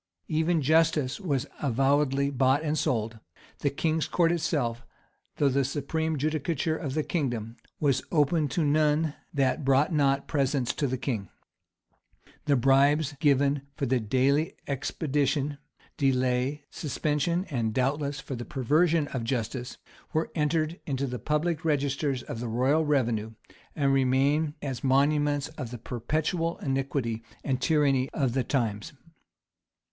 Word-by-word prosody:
Even 160 0 +1
justice 155 -2 +2
was 145 -9 -1 0.2
avowedly 140 +1 +2
bought 135 +2 +2
and 155 -1 0
sold; 115 -6 -1 0.4
the 145 - +1
king's 155 +3 0
court 170 -1 +2
itself, 130 -8 -1 0.5
though 145 - +3
the 140 +1 +2
supreme 155 +3 -2
judicature 155 +2 -1
of 145 -4 -4
the 155 - +1
kingdom, 120 -9 -2 0.2
was 140 -4 +2
open 150 0 +2
to 155 +4 0
none 150 +1 +2 0.2
that 135 0 +1
brought 135 +5 +3
not 140 -2 +2
presents 135 -4 0
to 145 - -1
the 130 0 -2
king; 115 -8 -3 1.2
the 145 - +3
bribes 140 +4 +3
given 140 -1 +3
for 145 - -2
the 130 +5 +1
expedition, 145 0 -1 0.4
delay,[*] 130 +1 +1
suspension, 155 +4 -1
and, 115 -5 0
doubtless, 140 +4 -1
for 135 - -7
the 120 -1 -4
perversion 150 +5 +2
of 125 -3 -3
justice, 120 +1 -3 0.4
were 160 +1 0
entered 155 +1 0
in 140 - -1
the 130 -2 -3
public 150 +6 -1
registers 140 -3 0
of 115 - -6
the 120 - -3
royal 130 +7 +2
revenue, 120 -7 0 0.4
and 140 -3 +2
remain 140 +3 +2
as 130 -4 -4
monuments 145 +2 +2
of 130 -5 -4
the 120 - -6
perpetual 155 - -2
iniquity 135 -4 -2 0.2
and 130 -2 -1
tyranny 140 -4 +2
of 135 -5 +1
the 130 -1 +1
times. 120 +2 -2
140 Hz, 135 wpm, -27 LUFS, 130-150 Hz, 1.2 s, though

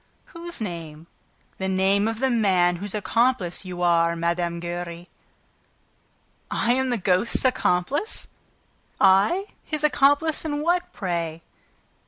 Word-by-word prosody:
"Whose 340 0 -6
name?" 165 -6 -6 0.5
"The 190 - -2
name 190 +2 +2
of 225 0 -3
the 265 -1 +2
man 185 -6 +2
whose 200 +3 -5
accomplice 210 -3 0
you 180 -1 -5
are, 170 -1 +3
Mme. 170 0 -1
Giry!" 175 0 -6 1.4
"I 235 - +1
am 260 +1 0
the 245 - 0
ghost's 190 +6 +1
accomplice? 255 - +1 0.7
I?... 200 - +4 0.2
His 305 -1 -3
accomplice 295 +1 +3
in 295 -2 -2
what, 350 +2 0
pray?" 170 -4 -3
195 Hz, 120 wpm, -24 LUFS, 175-260 Hz, 1.4 s, I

